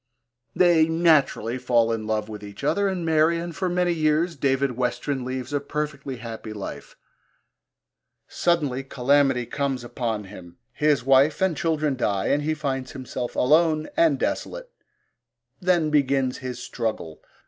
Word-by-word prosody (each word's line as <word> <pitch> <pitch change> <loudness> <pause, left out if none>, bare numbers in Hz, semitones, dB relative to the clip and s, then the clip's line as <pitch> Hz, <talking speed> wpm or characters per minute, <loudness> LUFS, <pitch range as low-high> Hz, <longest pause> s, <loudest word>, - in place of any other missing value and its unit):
They 170 -3 +5
naturally 155 -7 +2
fall 120 -2 +2
in 110 -1 -3
love 110 -1 -1
with 105 -1 -8
each 100 0 -10
other 200 0 +1
and 185 -3 -2
marry, 160 +1 +3
and 170 0 -5
for 190 -1 -1
many 175 0 +1
years 160 +2 +1
David 135 -1 +1
Westren 125 +2 -2
leads 130 +2 -5
a 145 - +1
perfectly 145 -2 -4
happy 115 -2 -7
life. 105 -2 -8 1.3
Suddenly 145 -7 0
calamity 135 -1 +2
comes 135 -1 -2
upon 115 -3 -3
him, 90 -3 -12 0.2
his 150 -4 +2
wife 135 +3 +4
and 190 -3 +1
children 155 -2 0
die 100 -6 -1
and 145 - +2
he 155 +1 -1
finds 135 -4 -3
himself 130 -2 -5
alone 155 +3 +3
and 330 0 +3
desolate. - - -3 0.9
Then 175 -4 +2
begins 135 -3 +1
his 125 -2 -5
struggle. 110 -10 -4
140 Hz, 145 wpm, -24 LUFS, 125-160 Hz, 1.3 s, They